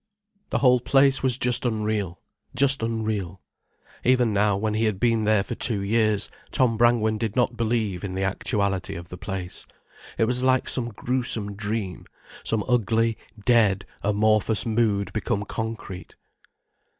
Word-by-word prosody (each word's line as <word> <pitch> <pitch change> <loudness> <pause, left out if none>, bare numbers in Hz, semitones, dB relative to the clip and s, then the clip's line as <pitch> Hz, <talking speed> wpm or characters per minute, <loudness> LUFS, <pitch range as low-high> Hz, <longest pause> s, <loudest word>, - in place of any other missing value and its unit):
The - - 0
whole 125 -2 +4
place 135 +2 +3
was 130 -2 +3
just 125 -1 +3
unreal, 105 -6 -2 0.4
just 135 +1 +3
unreal. 110 -5 -2 0.6
Even 125 -3 +3
now, 100 0 +2
when 110 +1 -1
he 110 +1 +1
had 105 -3 -1
been 115 -2 +2
there 105 -2 +3
for 120 - -5
two 110 -3 0
years, 110 0 +1 0.2
Tom 125 -5 +2
Brangwen 110 -2 +2
did 110 -2 -2
not 125 -1 +1
believe 110 -5 -1
in 95 -2 -4
the 95 - -1
actuality 100 0 -1
of 85 +1 -9
the 90 - -8
place. 95 -3 -5 0.5
It 115 - +3
was 125 +2 0
like 130 0 +2
some 120 -2 +1
gruesome 120 -2 -1
dream, 105 -3 -4 0.4
some 110 -2 0
ugly, 115 -2 +1 0.3
dead, 110 -6 +3 0.2
amorphous 110 +1 +2
mood 105 -4 0
become 105 -1 -2
concrete. 110 -5 -6
110 Hz, 150 wpm, -24 LUFS, 100-120 Hz, 0.6 s, whole